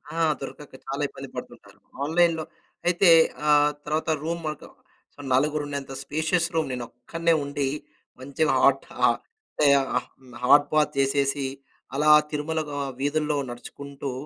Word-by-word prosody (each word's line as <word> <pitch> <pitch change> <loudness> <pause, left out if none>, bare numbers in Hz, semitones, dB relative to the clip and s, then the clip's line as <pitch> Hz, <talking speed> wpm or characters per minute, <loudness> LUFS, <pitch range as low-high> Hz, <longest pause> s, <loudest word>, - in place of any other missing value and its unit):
ఆ! 165 - 0 0.2
దొరకక 140 +1 -9
చాలా 140 +2 -4
ఇబ్బంది - - -10
పడుతుంటారు. - - -10 0.2
ఆన్లైన్‌లో 165 +1 +2 0.4
అయితే 175 +1 +4 0.4
ఆ! - - +3 0.4
తర్వాత 155 +2 -1
రూమ్ 170 +1 -3
మాత్రం 150 - -9 0.6
నలుగురు 150 +3 +2
ఉండేంత 140 -2 -5
స్పేషియస్ 160 +4 0
రూమ్. 160 -3 +1
నేను 125 -1 -3
ఒక్కడినే 165 +7 -1
ఉండి, 140 -1 -2 0.5
మంచిగా 140 +2 0
హాట్ 135 0 +4 0.2
అంటే 435 - -2 0.8
హాట్ 145 +3 +6
బాత్ 155 -1 +3
చేసేసి, 140 0 +1 0.5
అలా 150 +2 +2 0.2
తిరుమల 155 +2 -2
వీ 145 - -4 0.2
వీధుల్లో 150 +1 0
నడుచుకుంటూ 140 +3 -7
150 Hz, 120 wpm, -25 LUFS, 140-160 Hz, 0.8 s, హాట్